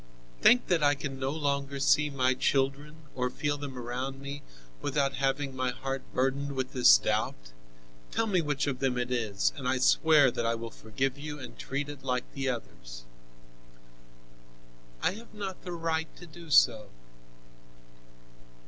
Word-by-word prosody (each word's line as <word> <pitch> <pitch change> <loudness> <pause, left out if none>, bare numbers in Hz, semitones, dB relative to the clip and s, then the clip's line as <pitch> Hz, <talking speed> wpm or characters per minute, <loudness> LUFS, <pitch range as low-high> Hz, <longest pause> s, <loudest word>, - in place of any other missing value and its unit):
"Think 245 0 +6
that 175 -3 +1
I 145 0 +4
can 135 -1 -6
no 130 0 -1
longer 140 -2 -2
see 150 +2 +4
my 130 -2 +2
children 140 +4 -1
or 125 -1 -1
feel 145 +3 -1
them 140 -3 -6
round 125 +3 -4
me, 140 +1 -6 0.4
without 140 -1 0
having 135 0 -1
my 130 -1 0
heart 135 +1 -4
burdened 135 +2 0
with 130 -1 -3
this 120 - +7
doubt. - - -2 0.6
Tell 225 - +1
me 190 -5 +2
which 145 -2 -1
of 135 -3 -2
them 130 -2 0
it 125 0 -2
is, 110 -6 0
and 130 -3 -5
I 130 - +2
swear 145 +1 +5
that 120 - -3
I 115 0 +1
will 115 0 -6
forgive 130 +7 -3
you 150 0 -6
and 125 -4 -9
treat 140 +2 -3
it 145 -2 -9
like 125 -2 0
the 135 -1 -2
others." - - -7 2.0
"I - - +3
have 220 +3 -12
not 195 -3 -5
the 180 - -7
right 165 -1 -1
to 175 - -11
do 170 0 -13
so." 110 -7 +4
135 Hz, 165 wpm, -29 LUFS, 125-145 Hz, 2.0 s, this